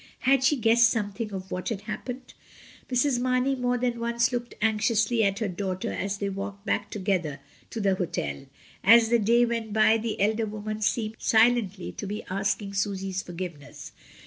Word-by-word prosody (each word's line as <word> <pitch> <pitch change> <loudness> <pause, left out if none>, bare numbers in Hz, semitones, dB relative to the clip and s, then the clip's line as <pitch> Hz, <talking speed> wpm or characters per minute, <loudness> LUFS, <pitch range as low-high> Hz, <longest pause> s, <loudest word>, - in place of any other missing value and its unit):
Had 265 0 +3
she 265 +3 +4
guessed 230 -1 +4
something 210 0 -3
of 190 -1 -7
what 180 - -3
had 210 -4 -3
happened? 245 +4 -7 0.6
Mrs. 250 0 +2
Mamey 255 +2 +1
more 250 -1 0
than 240 -1 -1
once 235 +1 +1
looked 240 -1 -4
anxiously 220 +1 +2
at 195 -1 +1
her 220 - -1
daughter 185 0 -3
as 195 +1 -3
they 200 - -2
walked 200 +1 -6
back - - -1
together 185 -8 -2 0.3
to 225 - -5
the 200 -2 +2
hotel. 75 - -3 0.4
As 225 +2 +7
the 235 0 +4
day 235 +3 +4
went 230 -2 -3
by 220 +1 +4
the 225 0 -3
elder 220 +2 +1
woman 215 +1 -5
seemed 215 0 -1
silently 220 -4 +2
to 205 - -6
be 210 +2 -4
asking 200 +1 -1
Susy's 195 -1 -2
forgiveness. 175 -5 -8
215 Hz, 170 wpm, -26 LUFS, 195-235 Hz, 0.6 s, As